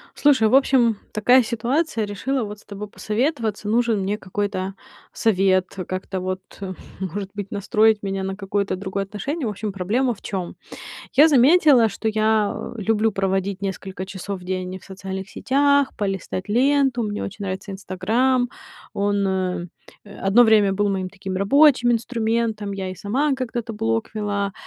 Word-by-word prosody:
Слушай, 265 -7 +4
в 255 - +1
общем, 250 -5 +4 0.2
такая 245 +5 +5
ситуация. 235 +3 -1
Решила 235 +6 -2
вот 210 0 -7
с - - -20
тобой 205 +1 -7
посоветоваться. 220 -1 -2
Нужен 230 -1 +2
мне 200 +2 -1
какой-то 195 -1 -3 0.4
совет, 190 -3 +2 0.2
как-то 185 0 -4
вот, 185 0 -3 0.6
может 190 +1 -4
быть, 200 -1 -5
настроить 215 +1 +2
меня 195 -1 -2
на 190 0 -3
какое-то 200 -1 -2
другое 195 +1 -3
отношение. 265 - -4
В - - 0
общем, 210 0 -4
проблема 220 +8 0
в - - -19
чём? 185 -3 -4 0.6
Я 295 +4 +7
заметила, 280 -3 +6
что 220 +2 -3
я 215 -1 +2 0.2
люблю 220 +1 +1
проводить 195 0 -1
несколько 190 -1 -5
часов 195 0 -6
в - - -13
день 185 0 -3
в - - -20
социальных 190 0 -6
сетях, 280 +3 +2
полистать 195 -1 -3
ленту. 265 +2 +2
Мне 210 -1 -3
очень 200 +1 -6
нравится 195 +1 -5
Instagram. 225 +7 0 0.5
Он, 200 0 +1
э, 185 -2 -1 0.6
одно 225 +5 +6
время 210 -3 +5
был 205 +1 +1
моим 190 -1 -1
таким 190 -1 -6
рабочим 245 +4 +5
инструментом, 225 -3 -1
я 190 -1 -4
и - - -6
сама 255 - 0
когда-то 240 -3 -4
блог 115 - -1
вела. 205 -2 -1
205 Hz, 155 wpm, -22 LUFS, 195-235 Hz, 0.6 s, Я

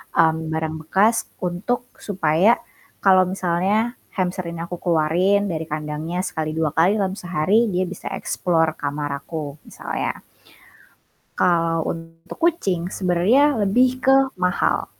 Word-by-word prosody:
mmm, 160 0 +4
barang 160 0 -2
bekas 215 +6 +2
untuk 195 +8 -2
supaya 195 +2 +2 0.5
kalau 185 -1 +6
misalnya 190 +6 0 0.2
hamster 185 -1 -1
ini 170 0 -5
aku 175 0 -6
keluarin 180 +5 +2
dari 160 -1 -3
kandangnya 155 +3 -3
sekali, 155 -4 -3
2 160 -2 0
kali, 170 +7 +3
dalam 190 -2 0
sehari, 185 +7 +2
dia 185 -1 0
bisa 185 +1 -7
explore 165 -3 0
kamar 145 0 -3
aku, 150 -1 -6
misalnya. - - -4 1.1
Kalau 165 -2 +2
untuk 165 0 -9
kucing 255 - +1
sebenernya 215 +10 +3
lebih 250 +6 +2
ke 265 +1 +5 0.2
mahal. 180 0 +1
180 Hz, 125 wpm, -22 LUFS, 160-200 Hz, 1.1 s, kalau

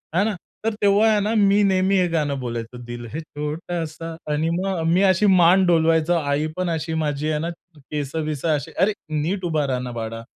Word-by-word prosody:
है 190 - +4
ना? 215 -2 -1 0.3
तर 225 - +1
तेव्हा 205 +2 +4
आहे 210 -1 +3
ना, 215 +2 0
मी 200 0 +4
नेहमी 190 0 +2
हे 180 -1 +3
गाणं 145 -4 -1
बोलायचो, 120 -1 -5
दिल 120 0 -7
है 160 - -3
छोटासा 160 +1 -5 0.2
आणि 155 +2 0
मग 185 -1 -1
मी 185 - +3
अशी 185 +3 +3
मान 185 0 +5
डोलवायचो. 165 -1 +3
आई 150 -1 0
पण 185 -1 -1
अशी, 160 0 -2
माझी 150 +1 -1
आहे 150 - 0
ना 165 +2 -2 0.3
केसं-विसं, 150 +2 -4
अशी, 145 - -5
"अरे, 210 +3 +3 0.3
नीट 185 +5 -2
उभा 155 -3 0
रहा 130 -2 -1
ना, 125 -1 -5
बाळा." 115 -1 -5
160 Hz, 195 wpm, -22 LUFS, 145-185 Hz, 0.3 s, मान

